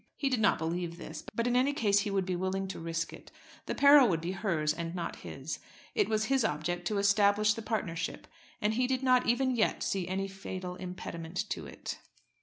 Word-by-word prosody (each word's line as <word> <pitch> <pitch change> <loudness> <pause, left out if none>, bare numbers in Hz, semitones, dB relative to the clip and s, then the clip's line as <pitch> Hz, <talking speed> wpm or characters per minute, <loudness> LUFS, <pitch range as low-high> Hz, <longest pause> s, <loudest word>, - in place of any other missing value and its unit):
He 275 - +1
did 255 -3 +1
not 215 -2 +4
believe 170 +1 -3
this; 155 -2 -8
but 230 - 0
in 245 0 +1
any 260 +3 +3
case 205 -7 +3
he 205 +1 -1
would 195 -2 0
be 185 -1 -1
willing 190 +2 -1
to - - -5
risk 165 0 -3
it. - - -12 0.4
The - - -2
peril 280 -2 +8
would 165 -3 +1
be 170 +2 -2
hers 170 -7 0
and 170 +1 -4
not 175 - -4
his. - - -6 0.3
It 420 - +2
was 215 0 +1
his 265 +1 +2
object 175 0 -1
to 210 - 0
establish 205 +1 +4
the 225 - -6
partnership, 170 -7 -3 0.3
and 210 +1 +1
he 250 +2 +1
did 260 0 -1
not 255 -1 +4
even 255 +2 +2
yet 225 - +1
see 190 -3 -1
any 190 +1 -1
fatal 190 -2 -6
impediment 180 -2 -5
to - - -3
it. - - -7
195 Hz, 210 wpm, -31 LUFS, 175-230 Hz, 0.4 s, peril